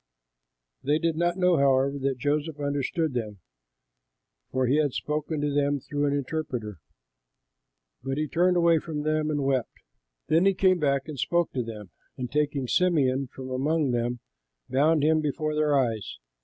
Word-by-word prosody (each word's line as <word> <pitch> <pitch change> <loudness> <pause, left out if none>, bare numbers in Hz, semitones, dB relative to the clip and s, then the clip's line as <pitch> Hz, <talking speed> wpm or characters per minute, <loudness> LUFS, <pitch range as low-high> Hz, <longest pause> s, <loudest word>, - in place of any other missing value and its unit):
They 145 +2 +2
did 165 0 0
not 175 +2 0
know, 180 -2 +3
however, 140 0 +2
that 135 -1 -1
Joseph 145 +3 -1
understood 145 +2 -1
them, 110 -4 -4 1.1
for 130 0 0
he 130 +4 +2
had 145 -4 +1
spoken 150 0 -2
to 145 -1 -1
them 145 0 +1
through 145 +2 -2
an 140 - +1
interpreter. 130 - -3 1.2
But 135 +2 -3
he 155 0 -1
turned 180 +4 +2
away 170 -1 +4
from 150 -2 -5
them 155 0 0
and 145 -2 -1
wept. 135 -3 -1 0.5
Then 165 +5 +3
he 195 - +3
came 185 -1 +3
back 140 -2 0
and 150 -4 -7
spoke 170 +4 +1
to 130 - -1
them, 105 -5 -8 0.3
and 125 -2 -5
taking 145 -3 0
Simeon 140 -6 +2
from 130 +1 -9
among 145 +2 +1
them, 120 0 -1 0.5
bound 150 +2 +2
him 155 +1 +3
before 155 +1 -2
their 150 -1 +2
eyes. 115 - -1
145 Hz, 165 wpm, -26 LUFS, 130-155 Hz, 1.2 s, away